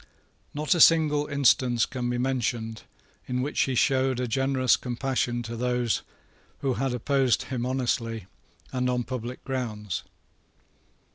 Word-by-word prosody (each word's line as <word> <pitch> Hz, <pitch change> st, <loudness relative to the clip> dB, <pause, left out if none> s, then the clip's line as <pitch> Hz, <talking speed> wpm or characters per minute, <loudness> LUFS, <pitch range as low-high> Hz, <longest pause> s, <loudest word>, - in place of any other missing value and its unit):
Not 150 Hz, +3 st, +1 dB
a 170 Hz, -, +2 dB
single 150 Hz, -3 st, +5 dB
instance 130 Hz, -4 st, +3 dB
can 125 Hz, -1 st, -3 dB
be 120 Hz, -, -1 dB
mentioned 120 Hz, -3 st, -1 dB, 0.5 s
in 125 Hz, 0 st, -1 dB
which 145 Hz, -, -3 dB
he 130 Hz, -, +1 dB
showed 130 Hz, 0 st, +2 dB
a 125 Hz, -, -1 dB
generous 130 Hz, +1 st, +2 dB
compassion 125 Hz, -1 st, -2 dB
to 115 Hz, 0 st, -6 dB
those 125 Hz, -1 st, 0 dB, 0.6 s
who 135 Hz, -2 st, +1 dB
had 135 Hz, +1 st, -1 dB
opposed 130 Hz, 0 st, +2 dB
him 125 Hz, -2 st, -3 dB
honestly 115 Hz, -5 st, -1 dB, 0.5 s
and 125 Hz, -1 st, 0 dB
on 125 Hz, -1 st, 0 dB
public 125 Hz, 0 st, -6 dB
grounds. 110 Hz, -7 st, -3 dB
125 Hz, 135 wpm, -27 LUFS, 120-135 Hz, 0.6 s, single